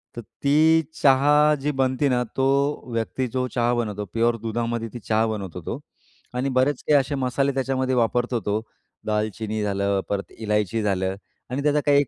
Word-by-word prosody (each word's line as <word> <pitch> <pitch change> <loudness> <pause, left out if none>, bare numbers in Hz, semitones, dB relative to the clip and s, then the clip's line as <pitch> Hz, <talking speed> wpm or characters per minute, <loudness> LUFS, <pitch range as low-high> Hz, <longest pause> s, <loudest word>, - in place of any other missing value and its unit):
तर 120 - -5
ती 155 +7 +3 0.2
चहा 145 +2 +5
जी 150 +2 0
बनते 135 +1 +1
ना, 125 -1 +2
तो 135 +3 0
व्यक्ती 115 +3 -1
जो 130 +1 -2
चहा 120 0 +2
बनवतो 105 -4 -2
प्युअर 115 +1 +2
दुधामध्ये 115 0 -2
ती 120 - -6
चहा 110 +1 +1
बनवतो 100 -5 -5
तो; - - -4 0.5
आणि 130 +2 -1
बरेच 135 +1 +1
काही 150 - +6
असे 140 +2 -2
मसाले 135 +1 0
त्याच्यामध्ये 130 0 0
वापरतो 120 +1 +1
तो, 105 +1 0 0.4
दालचिनी 110 0 -2
झालं, 100 -1 0
परत 100 -1 -3
इलायची 105 -1 0
झालं 95 -2 0 0.3
आणि 135 +3 -2
त्याचा 150 0 +3
काही 145 -1 +5
एक 145 - -3
125 Hz, 170 wpm, -24 LUFS, 110-135 Hz, 0.5 s, काही